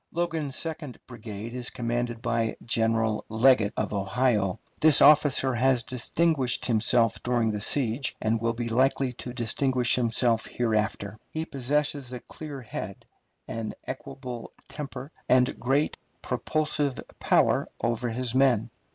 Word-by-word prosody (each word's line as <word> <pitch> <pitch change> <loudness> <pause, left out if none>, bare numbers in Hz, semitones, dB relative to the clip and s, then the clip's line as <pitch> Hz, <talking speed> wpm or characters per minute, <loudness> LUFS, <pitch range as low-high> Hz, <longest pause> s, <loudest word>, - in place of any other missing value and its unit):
Logan's 165 -5 -2
second 155 -5 -5
brigade 115 -2 -8
is 125 -1 -3
commanded 120 -1 -3
by 115 -1 0
General 115 -1 +1
Leggett, 110 -1 +4
of - - -1
Ohio. 100 -1 0 0.2
This 155 -2 +7
officer 145 -3 +5
has 125 +1 +2
distinguished 130 +2 +1
himself 115 -1 +2
during 120 -2 +1
the 105 -1 -3
siege, 125 +2 0
and 110 +1 0
will 115 0 0
be 120 0 -3
likely 130 +2 +1
to 125 +1 -7
distinguish 125 +1 +1
himself 115 -1 +2
hereafter. 110 -2 -1
He 160 0 -4
possesses 140 -1 -2
a 125 - -5
clear 145 +1 -9
head, 100 -3 -7 0.4
an 115 -1 -5
equable 125 -3 -7 0.2
temper, 140 -1 -7 0.2
and 125 0 +3
great 135 +5 +1 0.3
propulsive 150 -3 -1 0.2
power - - +3 0.2
over 120 +1 0
his 120 +1 -1
men. 130 -5 +3
120 Hz, 130 wpm, -27 LUFS, 115-135 Hz, 0.4 s, This